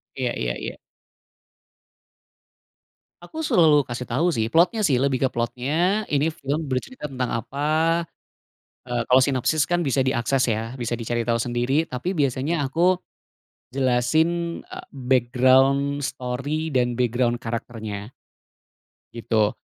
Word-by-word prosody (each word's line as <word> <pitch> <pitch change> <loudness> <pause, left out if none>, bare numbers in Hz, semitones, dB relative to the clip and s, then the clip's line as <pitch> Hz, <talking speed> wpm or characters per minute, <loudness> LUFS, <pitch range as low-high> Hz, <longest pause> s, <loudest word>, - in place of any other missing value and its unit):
Iya 125 -3 -1
iya - - -1
iya. - - -6 2.5
Aku 315 - -8
selalu 155 - +4
kasih 120 +1 -4
tau 145 +9 +2
sih, 110 -1 0
plotnya 180 +7 +3
sih, 135 - +2
lebih 135 -2 +1
ke 130 - +3
plotnya. 120 +3 -2 0.4
Ini 145 +1 +3
film 145 +2 -2
bercerita 150 - -4
tentang 130 -3 -3
apa. 140 +6 -5 1.2
Eee, 120 -1 -1
kalau 130 +1 +6
sinopsis 140 +3 +1
kan 175 - +2
bisa 135 0 +1
diakses 130 +1 +1
ya, 115 +4 -4
bisa 120 0 -2
dicari 120 +1 -2
tahu 115 -1 0
sendiri. 125 +7 0
Tapi 125 +7 -4
biasanya 140 0 0
aku 180 +5 +2 0.7
jelasin, 155 +7 +1
eee, - - -8 0.2
background 130 +3 +3
story 135 +7 -3
dan 125 -4 +1
background 120 0 0
karakternya, 110 -2 -5 1.0
gitu. 110 -2 +1
130 Hz, 120 wpm, -23 LUFS, 120-145 Hz, 2.5 s, kalau